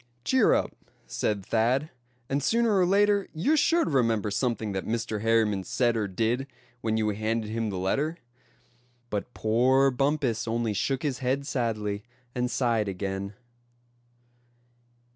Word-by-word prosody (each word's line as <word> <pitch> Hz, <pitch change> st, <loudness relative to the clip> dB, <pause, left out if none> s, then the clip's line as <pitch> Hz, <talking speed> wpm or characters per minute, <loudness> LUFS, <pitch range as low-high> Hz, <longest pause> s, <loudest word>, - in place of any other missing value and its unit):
"Cheer 260 Hz, -4 st, +4 dB
up!" -, -, -1 dB, 0.3 s
said 100 Hz, -3 st, -2 dB
Thad, 125 Hz, +7 st, +1 dB, 0.4 s
"and 140 Hz, +1 st, 0 dB
sooner 230 Hz, -, +2 dB
or 180 Hz, -, +3 dB
later 200 Hz, +1 st, +3 dB
you're 265 Hz, -, +2 dB
sure 330 Hz, +3 st, +3 dB
to -, -, -2 dB
remember 115 Hz, -6 st, +1 dB
something 115 Hz, -1 st, -1 dB
that 95 Hz, -1 st, -4 dB
Mr. 110 Hz, -2 st, -2 dB
Harriman 110 Hz, -3 st, +2 dB
said 120 Hz, +3 st, +1 dB
or 110 Hz, -2 st, 0 dB
did, 115 Hz, +7 st, -1 dB, 0.3 s
when 110 Hz, 0 st, 0 dB
you 110 Hz, -1 st, +1 dB
handed 110 Hz, +1 st, -2 dB
him 115 Hz, -1 st, -1 dB
the 95 Hz, -, -4 dB
letter;" 140 Hz, -, -1 dB, 0.9 s
but 105 Hz, +4 st, -3 dB
poor 130 Hz, +5 st, +3 dB
Bumpus 135 Hz, -3 st, 0 dB
only 115 Hz, -1 st, 0 dB
shook 135 Hz, +5 st, -1 dB
his 140 Hz, -4 st, -1 dB
head 135 Hz, +2 st, -1 dB
sadly, 110 Hz, -6 st, -2 dB, 0.3 s
and 125 Hz, 0 st, -1 dB
sighed 120 Hz, -4 st, +1 dB
again. 100 Hz, +1 st, -4 dB
115 Hz, 140 wpm, -27 LUFS, 105-135 Hz, 0.9 s, Cheer